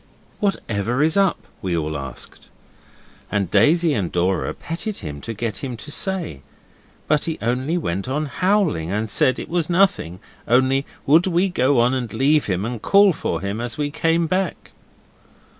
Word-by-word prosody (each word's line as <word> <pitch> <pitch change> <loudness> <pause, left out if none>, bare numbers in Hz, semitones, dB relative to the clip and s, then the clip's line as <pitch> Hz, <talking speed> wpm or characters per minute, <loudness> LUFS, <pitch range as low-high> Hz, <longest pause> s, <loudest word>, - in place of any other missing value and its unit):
'Whatever 120 - 0
is 160 +1 +2
up?' 195 -2 +2 0.2
we 90 -3 -1
all 80 -1 -2
asked, 70 -3 -7 0.8
and 100 -4 -1
Daisy 155 - +4
and 95 -8 -1
Dora 90 +2 0
petted 195 +6 -5
him 75 -1 -6
to - - -5
get 110 -1 -3
him 125 -3 -5
to 145 +7 -7
say, 180 - -2 0.7
but 150 0 +2
he 165 -1 -2
only 130 +8 -1
went 100 - -3
on 150 +3 -1
howling, 175 - +1
and 105 +1 -2
said 130 - +3
it - - -6
was 170 -1 -1
nothing, 175 - +2 0.3
only 130 +3 +3 0.2
would 160 +6 +5
we 185 +2 +2
go 130 -5 +2
on 120 +2 +3
and 125 -4 -2
leave 150 +3 +3
him, 95 0 -1
and 115 -2 -4
call 200 -1 +5
for - - -3
him 100 +3 -3
as 120 -1 -3
we 145 -1 -1
came 165 +2 +1
back. 185 +1 -2
130 Hz, 170 wpm, -21 LUFS, 105-170 Hz, 0.8 s, would